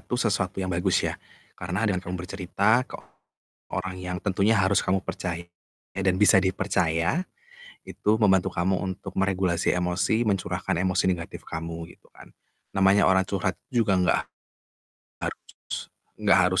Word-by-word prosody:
itu 125 - -3
sesuatu 95 -4 0
yang 95 - -2
bagus 90 +1 +1
ya. - - -3 0.4
Karena 90 +6 -2
dengan 95 -4 +1
kamu 90 -1 -5
bercerita 100 +5 +1
ke - - -7 0.7
orang 95 0 -4
yang 90 0 -4
tentunya 100 +3 +2
harus 95 0 +3
kamu 95 0 0
percaya 85 -1 -4 0.5
dan 95 -1 +1
bisa 95 -1 +6
dipercaya, 95 - 0 0.6
itu 105 - 0
membantu 95 -3 +3
kamu 95 +2 +1 0.2
untuk - - -10
meregulasi 95 -3 +1
emosi, 90 +5 +1
mencurahkan 95 -1 -1
emosi 95 0 +2
negatif 85 -1 -4
kamu, 80 +1 -6
gitu - - -19
kan. - - -15 0.4
Namanya 95 +1 +5
orang 95 0 +3
curhat 95 -2 -1
juga 110 -6 +2
nggak 90 -1 +3 1.1
harus - - -4 0.8
nggak 100 -2 +5
harus 95 0 +2
95 Hz, 140 wpm, -26 LUFS, 90-100 Hz, 1.1 s, bisa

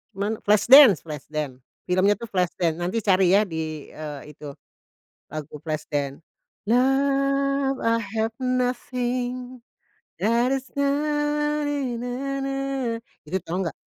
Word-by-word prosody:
Cuman 205 +3 -2
Flash 210 +4 +3
Dance 265 - +9
Flash 150 -4 -8
Dance, 150 -4 -4 0.2
filmnya 185 +3 +3
tuh 235 - -8
Flash 180 -3 0
Dance, 165 -2 0
nanti 185 +5 -2
cari 190 -1 +4
ya, 210 - +5
e - - -7
di 160 0 -2 0.7
itu, 150 0 -11 0.9
lagu 155 -2 -6
Flash 155 -1 -4
Dance, 140 -2 -2 0.5
"Love, 275 +2 +2
i 230 - +3 0.2
have 225 +1 -1
nothing 250 0 -2 0.5
and 235 +4 +2
is 265 0 -8
not 295 +1 0
ni-na-na." 270 -1 -2 0.3
Itu, 185 - -1
tahu 180 +3 -2
nggak? - - -7
245 Hz, 125 wpm, -24 LUFS, 185-275 Hz, 0.9 s, Dance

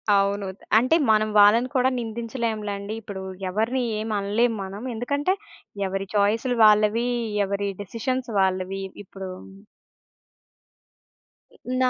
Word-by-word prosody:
అవును. 200 0 +1 0.3
అంటే 255 +8 +4
మనం 215 0 +4
వాళ్ళని 225 +5 +6
కూడా 255 0 +4
నిందించలేంలెండి. 220 -3 -3
ఇప్పుడు 200 -3 -7 0.3
ఎవరిని 225 +7 0 0.2
ఏం 220 +1 -4
అనలేం 220 +4 +1
మనం. 195 +3 -7
ఎందుకంటే 285 +9 0 0.5
ఎవరి 195 +1 -3
చాయిసులు 225 +5 +2
వాళ్ళవి. 215 +3 +4 0.4
ఎవరి 200 +1 -2
డిసిషన్స్ 245 +5 -3
వాళ్ళవి. 190 0 0 0.2
ఇప్పుడూ 190 -1 -8 2.2
హ్మ్, - - -23 0.2
నా 255 - +4
215 Hz, 105 wpm, -24 LUFS, 200-235 Hz, 2.2 s, వాళ్ళని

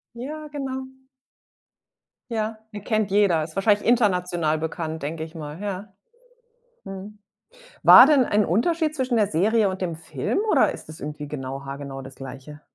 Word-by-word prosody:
Ja, 300 +5 -6
genau. 265 -3 -5 1.4
Ja, 220 0 -2 0.2
den 205 -1 -7
kennt 215 -3 0
jeder, 195 -6 +3
ist 160 0 -9
wahrscheinlich 205 +1 +2
international 180 -9 +2
bekannt, 160 -1 -4
denke 160 +2 -4
ich 160 +1 -10
mal, 155 +3 -7
ja. 200 0 -5 0.9
Mhm. 195 +2 -9 0.7
War 255 - +10
denn 285 -4 +5
ein 210 -1 +2
Unterschied 310 - +1
zwischen 255 -4 -1
der 210 -2 +3
Serie 210 +4 +2
und 190 0 -5
dem 170 -3 -2
Film 165 - -3
oder - - +4
ist - - -10
das 155 - -10
irgendwie 150 +1 -6
genau 135 -1 -6
haargenau 135 0 -7
das 135 0 -11
Gleiche? 135 +3 -10
190 Hz, 155 wpm, -24 LUFS, 155-225 Hz, 1.4 s, War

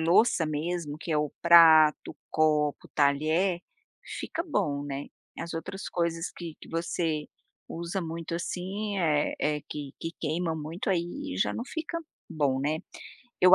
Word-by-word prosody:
louça 170 +2 +4
mesmo 155 0 -2
que 170 - -6
é - - +3
o 150 -1 -1
prato, 160 -3 +7
copo, 150 -2 +2
talher, 155 +6 +2 0.6
fica 335 - -3
bom, 150 - 0
né. 140 0 -4 0.3
As 170 0 -5
outras 180 +4 -5
coisas 170 -1 -1
que 170 -3 -6
que - - -12
você 165 -2 -1 0.4
usa 170 +3 -3
muito 165 -1 -4
assim, 195 +4 -3
eh 150 -4 +2
eh, 150 0 +1
que 145 -2 -6
que 165 - -3
queima 165 +1 0
muito, 160 +6 -4
aí, 190 +12 -2
já - - +2
não 235 - -4
fica 320 +4 -4 0.3
bom, 145 -5 +1
né. 150 +3 0 0.6
Eu 185 +1 +9
165 Hz, 145 wpm, -28 LUFS, 150-180 Hz, 0.6 s, Eu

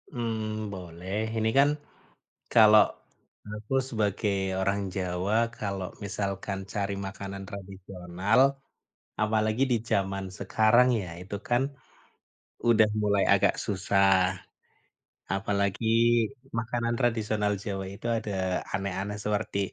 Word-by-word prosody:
Mmm, 110 -3 -3
boleh. 90 +1 -7 0.2
Ini 110 0 +2
kan 140 +1 +6 0.8
kalau 110 -1 +8 0.7
aku 105 +4 -5
sebagai 105 -3 0 0.3
orang 100 +1 +1
Jawa, 90 +2 -1 0.2
kalau 100 -3 -3 0.2
misalkan 100 -1 -3 0.2
cari 100 -1 -1
makanan 100 0 -6
tradisional, 95 +1 -2 0.8
apalagi 110 +2 +1
di 120 - +4
zaman 95 -2 0
sekarang 110 +5 +4
ya, 90 - -7
itu 95 +3 -6
kan 120 +1 +2 1.1
udah 110 -2 +6 0.2
mulai 100 -1 +3
agak - - +3
susah. 100 0 +1 1.3
Apalagi 100 +1 -1 0.7
makanan 120 0 -1
tradisional 110 -4 +1
Jawa 95 -2 -3
itu 105 - -8
ada 110 -2 -4 0.4
aneh-aneh 100 +1 -2
seperti 105 -1 -1
100 Hz, 100 wpm, -28 LUFS, 95-110 Hz, 1.3 s, kalau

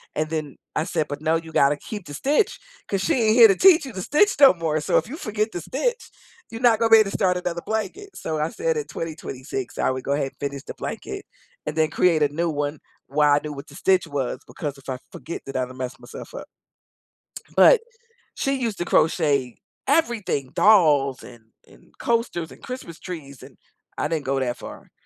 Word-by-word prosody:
and, 155 0 -1
then, 155 -3 -4 0.2
I 155 - +1
said, 155 -3 -1
"But, 145 +1 -5
no, 160 +1 +2
you 165 0 -4
gotta 140 +1 +4
keep 205 +5 -8
the 145 - -9
stitch 290 - +1 0.3
'cause 195 -1 -1
she 325 - +1
ain't 220 -2 +3
here 235 -2 +10
to 195 - +4
teach 360 -6 +6
you 260 - -8
to 185 - -5
stitch 310 - +3
no 275 -6 +9
more. 160 -3 -1
So - - +2
if - - 0
you 295 +6 -7
forget 215 - -2
to 175 - -4
stitch, 465 - -2 0.4
you 225 - -7
not 235 -3 +5
gonna 230 - +2
be 225 - +10
able 200 -2 +2
to - - -2
start 180 -3 +2
another 175 -1 -3
blanket." 345 - -4
So 155 -1 -3
I 155 +2 0
said 485 +2 -1
at 445 - -4
2026 135 -5 -6
I - - +1
would 130 0 -4
go 140 - +1
ahead 140 -2 -1
and - - -40
finish 140 -1 -4
the - - -7
blanket - - -6 0.4
and 150 - -4
then 155 -1 +3
create 165 -4 +3
a - - +4
new 165 +3 -1
one 145 0 -2 0.3
while 145 +1 +3
I - - +3
knew 150 - -5
what 140 +1 -9
the - - -14
stitch 185 -3 +2
was 140 -4 -3
because 145 -2 -5
if 135 - -12
I 130 -1 -3
forget, 170 - -7
then 135 - -8
I'd 125 -1 -1
have 130 - -12
messed 130 0 -5
myself - - -10
up, - - -8 1.1
but, 480 -3 +7 0.6
she 275 0 0
used 230 -6 -2
to 175 - -1
crochet 145 -7 +2 0.3
everything, 235 - 0
dolls 150 - +4
and 115 -2 -14 0.2
and - - -21
coasters 230 -8 -1
and - - -16
Christmas 250 -10 -7
trees, 145 -7 -8
and - - -14 0.4
I - - 0
didn't 155 -3 -2
go 135 0 0
that 125 -1 -1
far. - - -11
165 Hz, 220 wpm, -23 LUFS, 145-220 Hz, 1.1 s, here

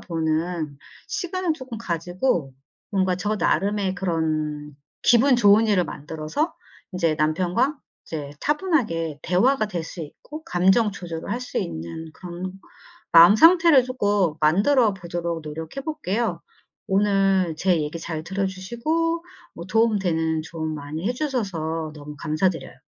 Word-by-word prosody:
보는 160 -2 -2 0.3
시간을 370 -3 -1
쪼끔 260 -5 -8
가지고 175 - -1 0.4
뭔가 190 -2 +1
저 205 +4 -1
나름의 200 -1 0
그런 155 -5 -2 0.3
기분 245 +2 +5
좋은 210 0 +5
일을 200 -5 +3
만들어서 160 - -3 0.4
이제 170 -4 +1
남편과 180 - +1 0.3
이제 150 -3 -5
차분하게 250 - 0
대화가 215 +7 +2
될 175 -6 -4
수 170 - -8
있고 295 - -9
감정 190 +5 +3
조절을 170 -4 -6
할 240 - -2
수 250 - -4
있는 85 - -5
그런 180 +1 -6 0.6
마음 170 +5 +9
상태를 330 -1 +7
쪼끔 205 -10 +1
만들어 205 - +4
보도록 170 -2 -4
노력해 160 - -6
볼게요. 240 - -2 0.5
오늘 195 -3 +2
제 180 -1 +2
얘기 150 +3 -4
잘 160 -1 -5
들어 195 +2 -2
주시고 305 - -2 0.3
뭐 170 - -8
도움 220 +1 +2
되는 160 -3 0
조언 160 -1 -5
많이 150 +5 -5
해 240 - 0
주셔서 180 - -2
너무 150 0 -9
감사드려요. 165 +3 -1
185 Hz, 280 characters per minute, -23 LUFS, 160-225 Hz, 0.6 s, 마음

